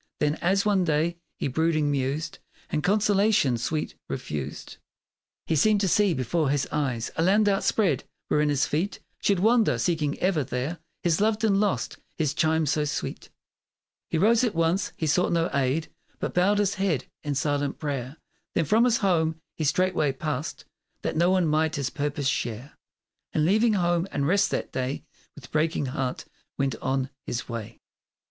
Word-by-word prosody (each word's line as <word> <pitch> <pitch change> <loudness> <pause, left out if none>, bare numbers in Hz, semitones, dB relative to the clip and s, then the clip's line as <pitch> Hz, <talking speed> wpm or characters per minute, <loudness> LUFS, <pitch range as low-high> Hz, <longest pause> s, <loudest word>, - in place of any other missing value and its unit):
Then, 150 0 +2
as 195 +3 +2
one 200 -3 +3
day 165 +1 +1 0.2
he - - -1
brooding 155 +1 +1
mused 140 +3 -2 0.3
And 150 - 0
consolation 200 - +3
sweet 150 +6 -2 0.2
refused, 70 -2 -5 0.7
He 160 - 0
seemed 210 +7 +4
to 195 - +2
see 195 -1 +3
before 135 +4 0
his 140 -1 +1
eyes 130 -6 -1
A - - +2
land 205 +5 +4
outspread, 200 -1 +2 0.2
wherein 150 0 +2
his 145 -1 +2
feet 175 +7 -1 0.2
Should 200 - +2
wander, 225 +3 +3
seeking 155 -4 0
ever 180 -5 +1
there 135 +6 -3 0.2
His 170 +1 +2
loved 215 +1 +1
and 200 -3 +3
lost 205 -2 0 0.2
his 150 -3 0
chime 160 0 +2
so 150 +1 +1
sweet, 150 - -4 0.8
He 165 - 0
rose 225 +7 +4
at 225 -5 0
once; 165 +3 +1
he 160 - -2
sought 165 +4 +2
no 170 0 +1
aid; 140 +4 0 0.3
But - - -3
bowed 190 +4 +3
his 200 -1 +2
head 185 -10 0 0.2
in 145 -2 -2
silent 145 0 0
prayer; 140 -1 -4 0.4
Then 165 - +2
from 220 - +4
his 235 -2 +3
home 160 -3 +2
he 160 - -4
straightway 155 -2 +2
passed 150 0 -4 0.4
That - - -2
no 170 +3 +3
one 185 -2 +3
might 155 0 +1
his 140 -3 -2
purpose 145 -1 -2
share. 120 0 -2 0.6
And 155 - +2
leaving 215 +5 +3
home 175 -2 +1
and 140 -1 0
rest 195 +3 +3
that - - -3
day 130 +2 -3 0.3
With 130 -5 -13
breaking 155 -1 +1
heart 130 0 -3 0.3
went 135 -1 0
on 130 0 -1 0.2
his 120 - -3
way. 115 -1 -6
160 Hz, 170 wpm, -26 LUFS, 140-190 Hz, 0.8 s, seemed